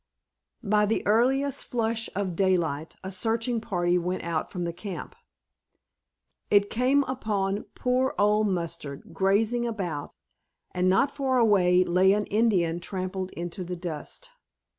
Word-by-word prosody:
By 210 0 +3
the 220 - 0
earliest 260 +6 +2
flush 225 -1 -1
of 190 -3 -2
daylight 165 -5 0
a 190 - -5
searching 225 +4 0
party 180 -5 +1
went 180 +2 -3
out 165 -2 -2
from 180 -1 -3
camp. 190 +1 -7 1.3
It 205 0 +4
came 260 +4 +3
upon 210 -6 -2
poor 255 +1 0
Old 210 +1 +3
Mustard 165 -6 -4
grazing 215 +7 +2
about, 180 -10 -4 0.6
and 180 0 +1
not 195 +9 +3
far 270 -3 0
away 185 -6 +4
lay 185 +2 +4
an 210 0 0
Indian 185 -7 +2
trampled 185 +1 -4
into 175 +2 -5
the 180 +1 -5
dust. 175 - -6
195 Hz, 130 wpm, -27 LUFS, 180-225 Hz, 1.3 s, It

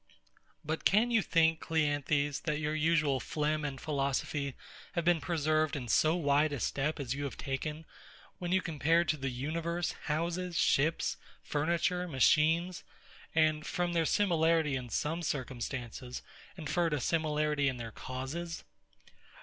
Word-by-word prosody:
But 160 +1 -2
can 220 +5 +4
you 230 -2 +4
think, 165 -3 +3
CLEANTHES, 145 -2 0
that 150 -3 0
your 150 0 -1
usual 155 -3 +2
phlegm 155 +1 -1
and 140 -2 -3
philosophy 140 -1 -1 0.4
have 170 -3 -1
been 175 -2 +3
preserved 155 -2 +1
in 130 -4 -4
so 155 +9 +3
wide 150 -2 +2
a 145 - -3
step 145 +6 -1
as 130 -3 -2
you 140 +1 -4
have 140 - -5
taken, 150 +3 -4 0.5
when 175 -1 -3
you 190 0 +3
compared 165 +2 +2
to 155 - +2
the 135 -1 -2
universe 165 +7 -2
houses, 170 +3 -1
ships, 155 +4 +2 0.3
furniture, 170 +4 0
machines, 160 +5 +3 0.5
and, 155 -1 +3
from 175 -1 -1
their 165 -1 +2
similarity 165 -6 +2
in 125 -2 -4
some 160 +8 -1
circumstances, 125 -3 -4 0.3
inferred 165 0 0
a - - -2
similarity 150 -1 +1
in 130 - -4
their 115 -1 -6
causes? 135 +9 -5
155 Hz, 140 wpm, -32 LUFS, 140-165 Hz, 0.5 s, can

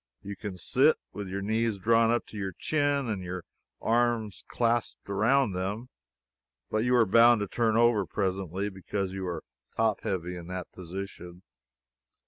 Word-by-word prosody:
You 100 +1 -6
can 100 -1 -6
sit, 135 - +3 0.2
with 100 -1 -5
your 95 +1 -4
knees 110 +1 0
drawn 115 +3 +3
up 120 +1 +1
to - - -12
your 95 -3 -3
chin 145 - 0
and 105 -4 -2
your 90 -1 -5 0.4
arms 115 -3 0
clasped 120 -1 -1
around 110 +5 +3
them, 100 +7 -3 0.8
but 110 - +1
you 125 +1 +3
are 120 -2 +5
bound 115 +2 +6
to 105 - -1
turn 110 +1 +1
over 115 -5 +4
presently, 95 +1 -2
because 95 0 -4
you 95 -1 -4
are 85 -3 -4 0.3
top 110 -2 +2
heavy 90 -1 -3
in 85 -1 -8
that 90 -1 -6
position. 90 0 -8
105 Hz, 160 wpm, -28 LUFS, 95-115 Hz, 0.8 s, bound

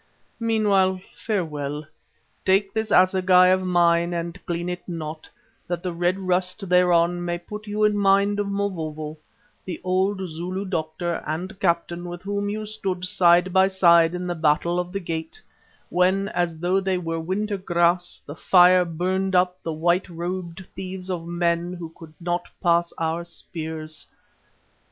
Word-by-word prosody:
Meanwhile, 205 -5 +2 0.2
farewell! 150 -8 -3 0.6
Take 195 +1 +2
this 220 0 -2
assegai 185 0 +5
of 185 0 +3
mine 175 -1 +2
and 170 +2 -5
clean 170 0 -2
it 180 0 -4
not, 160 -2 -6 0.4
that 175 0 -3
the 180 -2 -2
red 175 +2 +1
rust 185 +1 -1
thereon 175 -1 +3
may 175 0 -2
put 210 +5 -9
you 210 +1 -1
in 210 -1 +4
mind 200 +1 +3
of 205 - -1
Mavovo, 160 -6 -3 0.5
the 180 - -6
old 190 +2 +1
Zulu 180 +4 -4
doctor 170 -1 -3
and 180 +6 -4
captain 170 -1 0
with 175 0 -7
whom 205 0 -2
you 215 +1 -3
stood 190 -4 -3
side 175 0 +4
by 190 0 +5
side 170 -3 +4
in 180 0 -4
the 175 - -1
Battle 165 +2 +1
of 180 0 -3
the 195 - -2
Gate, 165 -3 -5 0.5
when, 190 +3 +2
as 175 -3 -1
though 180 +4 +1
they 190 -1 0
were 165 -2 -3
winter 200 +5 -2
grass, 175 -1 +1
the 145 - -7
fire 180 +2 +5
burnt 185 +3 -1
up 180 0 +2
the 165 - -4
white 175 +4 +1
robed 175 +1 -5
thieves 190 0 -6
of 170 -2 -4
men 170 0 0
who 170 -2 -7
could 160 -1 -13
not 175 +1 -2
pass 170 0 +2
our 165 +1 -1
spears." 160 -2 -6
180 Hz, 155 wpm, -24 LUFS, 170-190 Hz, 0.6 s, assegai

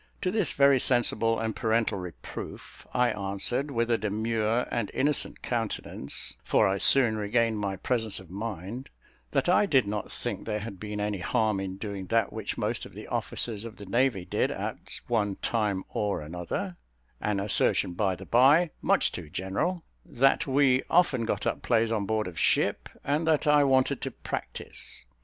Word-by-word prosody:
To 180 - +1
this 205 -6 +1
very 140 -1 +5
sensible 115 -2 +2
and 110 -1 -2
parental 110 -3 +1
reproof 90 -2 -8
I 125 -1 +2
answered, 100 +8 -1
with 115 -3 0
a 115 - +2
demure 110 +2 0
and 115 -4 -1
innocent 145 +1 0
countenance 115 - -4
(for - - +3
I 95 0 0
soon 120 -3 +5
regained 110 +1 +1
my 100 -2 -2
presence 110 +2 -1
of 95 -3 -14
mind) 105 +4 -5 0.4
that - - 0
I 185 +3 +4
did 135 - +4
not 105 +1 -4
think - - -3
there 105 -1 -1
had 100 -3 -7
been 105 0 -5
any 105 -1 -1
harm 110 +2 +1
in 95 -1 -4
doing 100 -2 -5
that 115 -1 +1
which 110 -2 -4
most - - -1
of - - -18
the - - -8
officers 110 -3 -2
of 115 -1 -8
the 100 - -9
navy 115 -2 +1
did - - 0
at - - -5
one 105 -4 0
time 105 -4 -1
or 105 -1 -1
another 90 +3 -4 0.4
(an 105 -2 0
assertion, 100 -2 +1
by 95 0 0
the 95 +2 -10
by, 145 - +5
much - - +3
too 80 -4 -7
general); 100 - -2 0.2
that 135 -4 +2
we 135 -1 +4
often 150 -9 +3
got - - -2
up - - -1
plays 115 -1 +2
on 105 -3 -1
board 110 -1 0
of 85 -2 -6
ship, - - +1
and 150 +3 0
that 155 -1 +3
I 150 -1 +5
wanted 130 -2 +2
to - - -2
practise. - - -7
110 Hz, 175 wpm, -28 LUFS, 100-125 Hz, 0.4 s, very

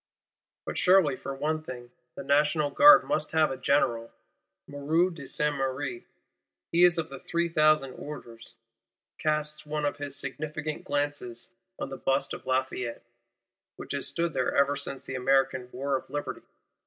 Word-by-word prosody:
But - - -3
surely, 180 -7 +5
for 135 +1 -6
one 155 +3 -1
thing, 125 -5 -9 0.2
the - - -6
National 150 +1 +2
Guard 295 +1 +8
must 285 - -1
have 160 -2 +3
a - - -2
General! 120 -4 +1 0.5
Moreau 155 +6 +1
de 145 -6 -9
Saint 150 -1 0
Méry, 130 -2 -3 0.7
he 170 +1 +4
of 170 -2 +1
the 135 -1 -8
"three 170 0 -1
thousand 155 -5 +3
orders," 115 -6 -9 0.6
casts 155 0 -1
one 150 0 -3
of 145 - -1
his 145 -1 -4
significant 150 +2 -4
glances 145 -4 -2 0.3
on - - -4
the 135 - -6
Bust 135 +1 0
of - - -9
Lafayette, 130 -2 -2 0.7
which - - -9
has 140 -1 -1
stood 170 -1 -1
there 130 -2 0
ever 140 0 +3
since 135 -1 -4
the - - -7
American 130 -1 +1
War 135 +2 -1
of 130 - -5
Liberty. 145 +2 -4
145 Hz, 155 wpm, -28 LUFS, 130-155 Hz, 0.7 s, Guard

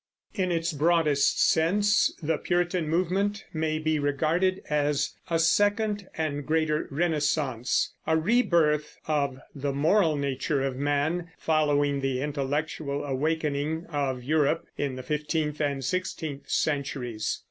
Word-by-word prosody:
In 185 -3 0
its 165 0 0
broadest 150 -2 +3
sense 205 +5 +3
the 155 0 0
Puritan 175 -2 0
movement 190 +5 0
may 155 -1 0
be 155 0 0
regarded 160 +6 +1
as 145 -1 0 0.2
a 165 - +2
second 205 +4 +2
and 145 -2 -2
greater 155 0 0
Renaissance, 145 -5 0
a 160 - +3
rebirth 160 -6 +2
of 140 -4 0 0.2
the 140 -1 -2
moral 160 +4 +3
nature 140 0 -1
of 135 -1 -1
man 145 +5 0
following 145 -3 +1
the 135 -1 -1
intellectual 145 +1 -2
awakening 150 +2 -1
of 135 -4 -1
Europe 150 +1 +1
in 140 -3 -2
the 130 - -7
fifteenth 150 +1 -2
and 140 -3 -1
sixteenth 160 -3 -3
centuries. 135 -7 -1
150 Hz, 125 wpm, -27 LUFS, 140-165 Hz, 0.2 s, broadest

